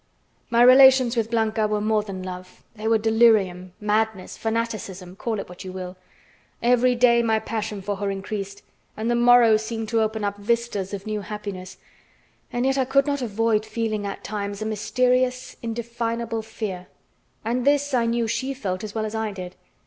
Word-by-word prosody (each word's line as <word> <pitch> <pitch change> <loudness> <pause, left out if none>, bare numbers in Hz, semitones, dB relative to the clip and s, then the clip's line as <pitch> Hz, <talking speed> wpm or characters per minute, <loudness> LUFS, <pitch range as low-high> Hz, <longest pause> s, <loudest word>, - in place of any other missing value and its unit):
My 235 0 +4
relations 255 -1 +7
with 225 -1 0
Blanca 220 -1 +1
were 210 0 0
more 215 0 +1
than 195 -3 -7
love; 185 0 -9
they 215 0 -4
were 225 0 +4
delirium, 215 -5 +3
madness, 215 -2 -1
fanaticism, 215 -5 -4
call 220 +1 -3
it - - -6
what 180 +2 -10
you 185 - -7
will. 185 0 -7 0.6
Every 245 +1 +3
day 235 -1 +5
my 225 -1 +2
passion 215 -2 -4
for 205 0 -3
her 200 0 -2
increased, 195 0 -5 0.3
and 225 +2 -1
the - - +2
morrow 240 -2 +6
seemed 220 0 -4
to 225 -1 +2
open 220 0 -1
up 205 0 -2
vistas 215 -3 -1
of 195 - -9
new 215 -1 -3
happiness. 200 -3 -7 0.7
And 245 +1 -1
yet 270 0 +2
I 260 - +2
could 275 +1 +3
not 285 -1 -1
avoid 225 -1 +1
feeling 215 -2 -2
at 195 - -6
times 200 -1 -4
a 215 - -4
mysterious, 250 +4 0
indefinable 230 0 -3
fear. 210 -5 -6 0.6
And 240 +2 0
this 285 +1 +2
I 235 -2 +2
knew 230 0 0
she 265 +4 -2
felt 190 -7 -4
as 210 0 -7
well 220 -1 -1
as 215 - -5
I 220 -1 -2
did. 185 -2 -8
220 Hz, 180 wpm, -24 LUFS, 205-235 Hz, 0.7 s, relations